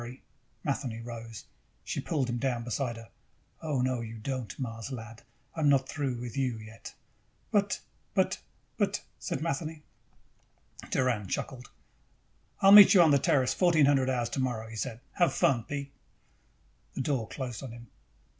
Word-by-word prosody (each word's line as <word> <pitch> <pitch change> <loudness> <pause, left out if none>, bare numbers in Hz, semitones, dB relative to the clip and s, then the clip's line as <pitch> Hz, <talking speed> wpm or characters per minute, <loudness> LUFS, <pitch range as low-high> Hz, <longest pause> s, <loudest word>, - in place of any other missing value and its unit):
Matheny 135 -5 -2
rose. 115 -2 -8 0.4
She - - -3
pulled 140 -5 -1
him 120 0 -2
down 125 -3 -1
beside 120 0 -2
her. 115 -1 -12 0.5
"Oh, 150 -6 0
no, 130 -2 0
you 115 0 -7
don't, 125 -2 -4
Mars 115 -1 -5
lad. 115 -2 -8 0.3
I'm 155 -3 +2
not 135 -2 +3
through 140 -4 -2
with 120 0 -6
you 130 -4 0
yet!" 110 +1 -11 0.6
"But, - - +2 0.4
but, - - +2 0.4
but," - - 0 0.2
said - - -3
Matheny. 155 0 -3 1.1
Doran 120 -6 +1
chuckled. 125 +5 -4 0.9
"I'll 195 - +7
meet 205 0 +11
you 180 - +9
on 160 - +5
the 140 - +5
Terrace 130 -1 +2
at - - -14
fourteen 170 -5 +5
hundred 135 -2 +3
hours 120 -3 0
tomorrow," 125 -5 -2
he 115 - -9
said. 115 +1 -4 0.2
"Have 175 -3 +4
fun, 120 -4 +2
Pete." 140 -1 -5 1.0
The - - -1
door 130 -5 -1
closed 125 -5 -5
on 135 -4 -7
him. 120 0 -10
130 Hz, 155 wpm, -30 LUFS, 115-140 Hz, 1.1 s, meet